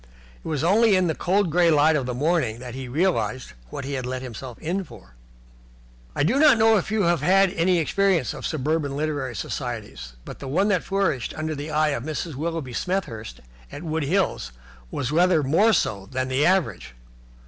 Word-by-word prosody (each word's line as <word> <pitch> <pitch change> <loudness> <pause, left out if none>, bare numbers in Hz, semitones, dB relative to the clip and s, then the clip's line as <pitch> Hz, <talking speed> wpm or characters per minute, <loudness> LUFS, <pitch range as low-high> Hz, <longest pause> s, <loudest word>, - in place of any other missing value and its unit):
It - - -9
was 150 -3 -2
only 210 +4 +4
in 185 -1 +3
the 160 - 0
cold, 185 +2 0
grey 175 +1 +4
light 155 0 +4
of 135 -4 -1
the 125 - -3
morning 150 -5 0
that 125 0 -8
he 130 0 -6
realized 130 - -1 0.2
what 135 - -6
he 140 - -4
had 130 -2 -3
let 130 0 -4
himself 125 0 -8
in 180 +5 -2
for. 60 - -15 1.0
I 145 - +1
do 225 - +2
not 300 -5 +6
know 225 0 +5
if 195 - -2
you 215 -1 +1
have 170 -1 +2
had 195 +1 +4
any 180 0 +2
experience 180 -2 +1
of - - -9
suburban 150 -1 -1
literary 145 -5 -2
societies, 110 - -5
but - - -9
the 135 - -7
one 185 +10 +1
that 185 -4 +1
flourished 195 -11 -1
under 155 0 -2
the 145 +1 -6
eye 155 0 +2
of 140 -5 -2
Mrs. 155 +2 -4
Willoughby 155 -2 -4
Smethurst 120 - -4 0.3
at - - -8
Wood 160 -1 -2
Hills 170 - 0 0.4
was 130 - -3
rather 170 -1 +3
more 170 +12 +4
so 100 - 0
than 130 0 -2
the 130 +3 +2
average. 180 - 0
155 Hz, 195 wpm, -24 LUFS, 130-180 Hz, 1.0 s, not